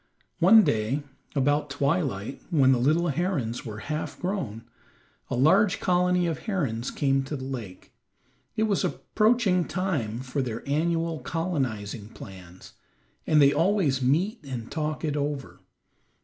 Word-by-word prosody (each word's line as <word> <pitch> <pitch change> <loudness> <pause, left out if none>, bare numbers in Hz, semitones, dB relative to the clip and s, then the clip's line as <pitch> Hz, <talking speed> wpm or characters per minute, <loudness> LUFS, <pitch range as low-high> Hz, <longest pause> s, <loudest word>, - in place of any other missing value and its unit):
One 205 +5 +7
day 130 - 0 0.3
about 145 +2 +1
twilight, 140 - -1
when 140 -7 +4
the 130 - +3
little 160 +7 +2
herons 145 -8 -1
were 110 0 -7
half 155 +1 -4
grown, 170 - -3 0.7
a - - -1
large 190 - +4
colony 180 0 +2
of 165 -2 -2
herons 135 - -1
came 135 -1 +1
to 150 - -4
the 130 - -6
lake. 120 -9 -7 0.6
It 220 - +1
was 210 -3 +1
approaching 215 -5 +2
time 140 - -2
for 130 +2 -2
their 120 -1 -5
annual 165 +2 0
colonizing 125 - -3
plans, 95 -4 -12 0.5
and 155 - +4
they 140 0 +6
always 170 -8 +2
meet 165 - +1
and 125 -4 -6
talk 155 0 -2
it 150 -2 -1
over. 145 -1 -3
145 Hz, 135 wpm, -26 LUFS, 125-175 Hz, 0.7 s, One